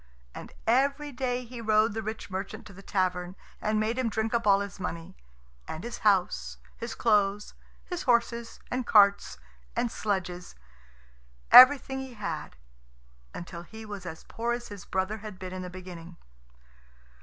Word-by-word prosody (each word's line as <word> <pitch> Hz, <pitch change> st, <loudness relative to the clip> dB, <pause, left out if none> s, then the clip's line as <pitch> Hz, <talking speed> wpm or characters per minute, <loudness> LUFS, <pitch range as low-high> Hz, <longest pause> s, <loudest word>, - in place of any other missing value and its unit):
And -, -, -9 dB
every 280 Hz, +5 st, +2 dB
day 250 Hz, -1 st, -2 dB
he 240 Hz, 0 st, -8 dB
rode 215 Hz, -1 st, +3 dB
the 225 Hz, -, -3 dB
rich 220 Hz, -1 st, -6 dB
merchant 195 Hz, +4 st, -5 dB
to 205 Hz, -, -12 dB
the 195 Hz, -, -12 dB
tavern, 185 Hz, -2 st, -1 dB, 0.3 s
and 215 Hz, 0 st, +1 dB
made 225 Hz, +4 st, 0 dB
him 250 Hz, -3 st, +1 dB
drink 220 Hz, +1 st, -2 dB
up 230 Hz, -2 st, +1 dB
all 200 Hz, 0 st, +5 dB
his 200 Hz, -1 st, -6 dB
money, 165 Hz, -3 st, -5 dB, 0.5 s
and 160 Hz, -, -6 dB
his 235 Hz, 0 st, -6 dB
house, 175 Hz, -, +1 dB, 0.2 s
his 230 Hz, -1 st, -6 dB
clothes, 210 Hz, -2 st, +1 dB, 0.3 s
his 355 Hz, -2 st, -4 dB
horses 235 Hz, -2 st, 0 dB
and 250 Hz, -1 st, -2 dB
carts 200 Hz, -, +5 dB, 0.4 s
and 240 Hz, -, 0 dB
sledges 180 Hz, -5 st, -3 dB, 1.0 s
everything 265 Hz, 0 st, +9 dB
he 265 Hz, -2 st, -8 dB
had 170 Hz, -, -5 dB, 0.8 s
until 175 Hz, 0 st, -7 dB
he 220 Hz, +5 st, -11 dB
was 200 Hz, -4 st, -7 dB
as 160 Hz, -1 st, -8 dB
poor 235 Hz, +1 st, -2 dB
as 240 Hz, 0 st, -5 dB
his 205 Hz, -3 st, -9 dB
brother 190 Hz, +3 st, -1 dB
had 210 Hz, -2 st, -8 dB
been 185 Hz, 0 st, -7 dB
in 185 Hz, -, -5 dB
the 180 Hz, -, -6 dB
beginning. 175 Hz, -2 st, -10 dB
210 Hz, 160 wpm, -28 LUFS, 185-235 Hz, 1.0 s, everything